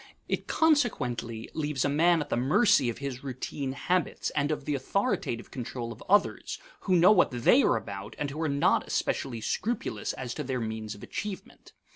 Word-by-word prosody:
It - - -2
consequently 125 - +1
leaves 150 -4 -1
a - - +3
man 165 +3 +3
at - - -5
the - - +1
mercy 135 - +4
of 115 - -4
his 140 -2 -5
routine 130 +1 -4
habits 180 +5 -1
and 145 0 0
of 150 -3 -2
the 150 - -1
authoritative 175 - -1
control 120 -2 -5
of 115 - -10
others, 205 +2 +2 0.2
who 185 - +1
know 175 +4 +7
what 185 -4 +5
they 125 - +4
are - - +3
about 100 -1 -7
and 145 -1 -2
who 155 +3 -5
are 160 - 0
not 140 0 +2
especially 120 -4 -1
scrupulous 235 - -2
as 125 -2 -5
to 150 - -4
their 130 -2 -2
means 110 -2 -4
of 100 - -13
achievement. 210 -3 -7
140 Hz, 185 wpm, -28 LUFS, 120-175 Hz, 0.2 s, know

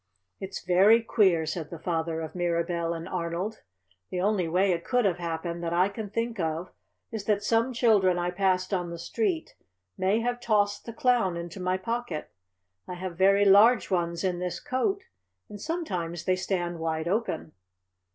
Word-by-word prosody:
"It's 190 0 -6
very 200 +6 +5
queer," 190 -8 +3
said 155 0 -4
the 170 - -7
father 165 -1 -2
of 160 - -6
Mirabell 170 -1 -1
and 165 0 -6
Arnold. 180 +4 -3 0.5
"The 180 - -3
only 190 -2 +1
way 185 +4 +2
it 170 -1 -1
could 250 -3 +1
have 180 -3 +1
happened 170 0 -4
that 170 0 -2
I 180 +3 +3
can 205 0 -6
think 230 +1 -2
of 165 +1 -2 0.4
is 220 -3 -5
that 205 -1 +1
some 230 +4 +2
children 210 -7 +3
I 175 0 -1
passed 185 +1 +1
on 175 -2 -1
the 170 - -6
street 340 - -2 0.5
may 195 +4 +2
have 245 +1 -1
tossed 205 -3 +1
the - - -4
Clown 240 -9 +2
into 170 +2 -7
my 185 0 0
pocket. 230 -5 -4 0.6
I 180 - -5
have 180 -1 -5
very 195 +3 +4
large 210 +5 +6
ones 170 -1 0
in 180 -2 0
this 180 -1 -3
coat, 385 +10 -1 0.5
and 205 -1 -9
sometimes 180 - -3
they 185 - +3
stand 175 -2 -2
wide 160 0 -2
open." 190 -5 -1
185 Hz, 175 wpm, -27 LUFS, 170-215 Hz, 0.6 s, large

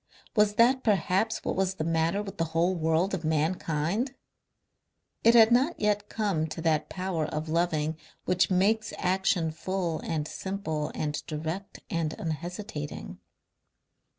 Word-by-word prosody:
Was 210 -1 +4
that 255 +4 +4
perhaps 200 +2 +1
what - - 0
was 190 0 0
the 155 - -2
matter 165 +5 +1
with 195 -4 -9
the 165 - +2
whole 175 +3 +3
world 165 +3 +1
of 180 -3 -2
mankind? 160 - 0 1.1
It 230 +1 +6
had 225 0 +8
not 265 +8 +3
yet 210 -1 +1
come 195 -8 0
to 160 +1 -6
that 155 -2 +1
power 180 -4 -2
of 155 +1 -4
loving 160 -1 0 0.3
which 180 0 +2
makes 210 +4 +2
action 180 -3 +1
full 170 0 -2
and 155 -2 -2
simple 160 -7 -3
and 150 -1 -2
direct 160 +5 -5
and 165 -2 -1
unhesitating. 165 0 -5
175 Hz, 140 wpm, -28 LUFS, 160-200 Hz, 1.1 s, had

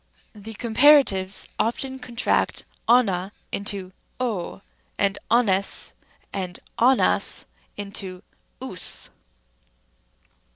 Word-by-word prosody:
c. 210 - -14
The 220 +2 -7
comparatives 230 -5 +4
often 265 +3 -1
contract 245 -2 0 0.2
ova 200 -6 +3 0.2
into 200 -2 -1 0.3
w, 215 -8 -3 0.4
and 200 0 +1
oves 200 -5 +2 0.4
and. 185 -2 -4 0.2
ovas 255 +2 +3 0.3
into 195 -2 -5 0.4
ous. - - -2
205 Hz, 80 wpm, -24 LUFS, 190-245 Hz, 0.4 s, comparatives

